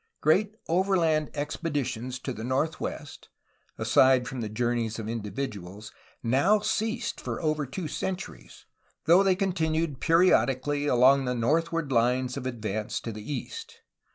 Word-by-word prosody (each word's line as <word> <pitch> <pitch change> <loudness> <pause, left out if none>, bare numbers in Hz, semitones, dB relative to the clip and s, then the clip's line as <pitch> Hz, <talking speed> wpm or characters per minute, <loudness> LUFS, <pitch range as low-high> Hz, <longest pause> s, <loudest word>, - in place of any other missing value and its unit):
Great 205 +7 +2
overland 165 -4 +2
expeditions 140 -5 -3
to 130 +1 -5
the 110 - -7
northwest, 145 +3 -3 0.5
aside 130 -2 +4
from 130 -2 -5
the 110 - -3
journeys 115 0 -1
of 110 -2 -5
individuals, 105 -3 -5 0.3
now 140 - +3
ceased 220 +3 -2
for - - -4
over 155 -3 -1
two 165 +5 -5
cen 190 +5 -2
turies, - - -12 0.4
though 175 +4 +6
they 195 -1 +3
continued 165 -6 -1
periodically 145 -4 +3
along 135 +1 +5
the 125 0 -1
north 155 +8 +1
ward 165 -4 -2
Hnes 125 +1 +1
of 135 -2 -4
advance 110 -3 -3
to 115 - -5
the 105 +5 -7
east. 455 - -6
140 Hz, 140 wpm, -27 LUFS, 120-165 Hz, 0.5 s, though